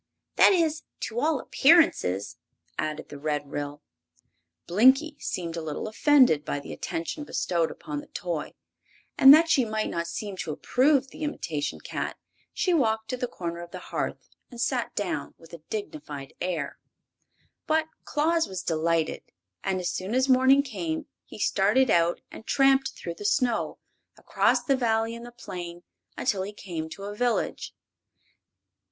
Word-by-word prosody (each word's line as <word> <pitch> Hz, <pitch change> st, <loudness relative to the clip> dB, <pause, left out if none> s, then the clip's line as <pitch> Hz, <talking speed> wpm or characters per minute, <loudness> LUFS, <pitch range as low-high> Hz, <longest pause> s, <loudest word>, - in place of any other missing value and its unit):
"That -, -, +7 dB
is, 320 Hz, -4 st, +2 dB, 0.2 s
to 225 Hz, +2 st, -3 dB
all 300 Hz, 0 st, +1 dB
appearances," 270 Hz, -, +3 dB, 0.4 s
added 155 Hz, 0 st, -3 dB
the 145 Hz, -, -9 dB
Red 145 Hz, -1 st, -2 dB
Ryl. 145 Hz, 0 st, -5 dB, 0.8 s
Blinkie 265 Hz, -, +4 dB
seemed 170 Hz, -2 st, -3 dB
a 165 Hz, -, -3 dB
little 155 Hz, +5 st, -4 dB
offended 245 Hz, -, +4 dB
by 145 Hz, -, -2 dB
the 140 Hz, -, -8 dB
attention 170 Hz, -, -4 dB
bestowed 170 Hz, -, 0 dB
upon 150 Hz, -1 st, -6 dB
the -, -, -11 dB
toy, 170 Hz, -4 st, -4 dB, 0.6 s
and 270 Hz, -, +9 dB
that 320 Hz, +3 st, +8 dB
she 270 Hz, -5 st, +4 dB
might 215 Hz, -1 st, -2 dB
not 170 Hz, 0 st, -2 dB
seem 195 Hz, +3 st, -5 dB
to 165 Hz, -, -3 dB
approve 270 Hz, -, +2 dB
the -, -, -12 dB
imitation 160 Hz, -, -3 dB
cat -, -, -4 dB, 0.3 s
she 365 Hz, -, 0 dB
walked 220 Hz, -7 st, +1 dB
to 255 Hz, -, -2 dB
the 250 Hz, -, -2 dB
corner 170 Hz, -5 st, -5 dB
of 175 Hz, -, -9 dB
the -, -, -7 dB, 0.2 s
hearth -, -, -3 dB, 0.2 s
and 240 Hz, -, -11 dB
sat 245 Hz, 0 st, -1 dB
down 170 Hz, -8 st, -3 dB
with 165 Hz, 0 st, -17 dB
a 170 Hz, -, -8 dB
dignified 175 Hz, -, -6 dB
air. 170 Hz, -6 st, -3 dB, 0.9 s
But 315 Hz, 0 st, +2 dB, 0.2 s
Claus 325 Hz, +2 st, +1 dB
was 190 Hz, -2 st, -5 dB
delighted, 165 Hz, 0 st, 0 dB, 0.4 s
and 190 Hz, -1 st, 0 dB
as 180 Hz, -, -1 dB
soon 190 Hz, +5 st, -3 dB
as 260 Hz, +1 st, +3 dB
morning 260 Hz, +1 st, +5 dB
came 175 Hz, -, -4 dB, 0.2 s
he -, -, -11 dB
started 210 Hz, +5 st, +3 dB
out 170 Hz, 0 st, +2 dB
and 220 Hz, -, -11 dB
tramped 270 Hz, -1 st, +3 dB
through 170 Hz, -1 st, -6 dB
the -, -, -6 dB
snow, 235 Hz, +3 st, +1 dB, 0.4 s
across -, -, +2 dB
the 275 Hz, -, +2 dB
Valley 225 Hz, -2 st, +1 dB
and 235 Hz, +1 st, -8 dB
the -, -, -10 dB
plain, 175 Hz, -6 st, -8 dB, 0.3 s
until 205 Hz, -7 st, 0 dB
he 200 Hz, +2 st, -5 dB
came 170 Hz, -6 st, -6 dB
to 195 Hz, +5 st, -9 dB
a 205 Hz, +1 st, -5 dB
village. 240 Hz, +2 st, -1 dB
205 Hz, 160 wpm, -27 LUFS, 165-265 Hz, 0.9 s, and